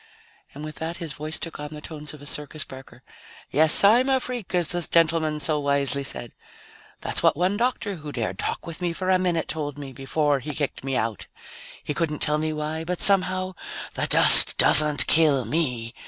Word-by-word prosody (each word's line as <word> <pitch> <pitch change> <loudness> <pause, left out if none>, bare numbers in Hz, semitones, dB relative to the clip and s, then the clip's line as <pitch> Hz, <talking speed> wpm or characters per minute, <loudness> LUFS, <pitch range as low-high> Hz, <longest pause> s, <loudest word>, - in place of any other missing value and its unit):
And 145 - -10
with 155 -2 -11
that 165 +3 -7
his 165 -5 -7
voice 155 +1 -6
took 165 - -9
on 150 - -7
the - - -10
tones 150 -1 -8
of 150 -2 -14
a - - -12
circus 150 +1 -5
barker. 130 0 -15 0.5
"Yes, 155 +5 +3
I'm 240 +6 +3
a 265 -1 +1
freak, 245 -7 -7
as 175 -3 -1
the 175 0 -1
gentleman 160 -2 -1
so 150 0 -1
wisely 140 -1 -2
said. 120 -3 -7 0.7
That's - - -2
what - - +1
one 180 +4 -1
doctor 225 -4 -3
who 150 -1 -10
dared 110 -8 -6
talk - - -5
with 170 +1 -9
me 175 -1 -3
for 185 +2 -4
a 185 - +1
minute 175 -3 -3
told 145 -3 -6
me 140 -2 -10
before 140 +2 -2
he 145 +2 -8
kicked 145 -4 -5
me 135 -1 -4
out. 110 -3 -4 0.6
He 150 - -5
couldn't 155 -1 -3
tell 150 0 -1
me 155 0 -3
why, 155 +1 -6
but 180 +1 -6
somehow 185 -1 +1 0.4
the - - -4
dust - - +9
doesn't 150 -1 +7
kill 150 -6 +1
me. 125 -4 -3
155 Hz, 200 wpm, -22 LUFS, 145-175 Hz, 0.7 s, dust